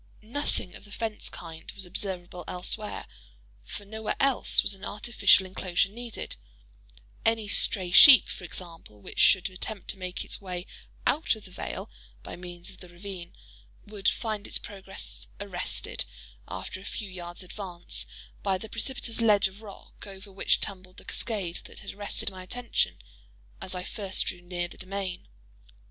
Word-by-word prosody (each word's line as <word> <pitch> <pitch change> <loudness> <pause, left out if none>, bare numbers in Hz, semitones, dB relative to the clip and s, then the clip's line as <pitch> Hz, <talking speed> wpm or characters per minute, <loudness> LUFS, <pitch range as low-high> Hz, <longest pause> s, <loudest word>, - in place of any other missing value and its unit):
Nothing 230 -5 -1
of - - -11
the 205 - -13
fence 220 +1 -1
kind 165 -2 -7
was 195 - -1
observable 180 -1 -3
elsewhere; 205 +4 -1 0.6
for 205 - -6
nowhere 220 +1 -2
else 275 -2 +5
was - - +4
an 190 - -11
artificial 210 -2 +4
enclosure 185 0 +1
needed:—any - - -4
stray 190 -2 +3
sheep, 265 - +11
for - - -6
example, 165 - -6
which - - -7
should 190 -1 +7
attempt 190 +2 -4
to 195 - +1
make 185 0 -4
its - - 0
way 180 -2 -4 0.4
out 310 -5 +3
of 215 - -12
the 185 - -11
vale - - -4 0.4
by - - -6
means 175 0 -6
of 185 - -13
the 180 - -11
ravine, 175 0 -8 0.5
would 205 -2 +2
find 215 -3 -2
its - - +3
progress 195 -1 -6
arrested, 195 -3 -2 0.4
after 95 - -5
a - - -11
few 205 +1 -3
yards' 175 -1 -7
advance, 180 -2 -4 0.3
by 190 -1 +2
the 220 +4 -7
precipitous 230 0 0
ledge 210 -3 +6
of 190 +3 -12
rock 205 -1 -11
over 195 0 -9
which 195 - +3
tumbled 185 -1 -4
the - - -12
cascade 195 -7 -1
that - - -9
had - - -6
arrested 205 0 -1
my 185 -1 -8
attention 235 +6 0 0.6
as 185 - -3
I 180 - -3
first 195 -1 0
drew 180 - -2
near 175 0 -2
the - - -13
domain. 190 -1 -4
190 Hz, 160 wpm, -29 LUFS, 180-210 Hz, 0.6 s, sheep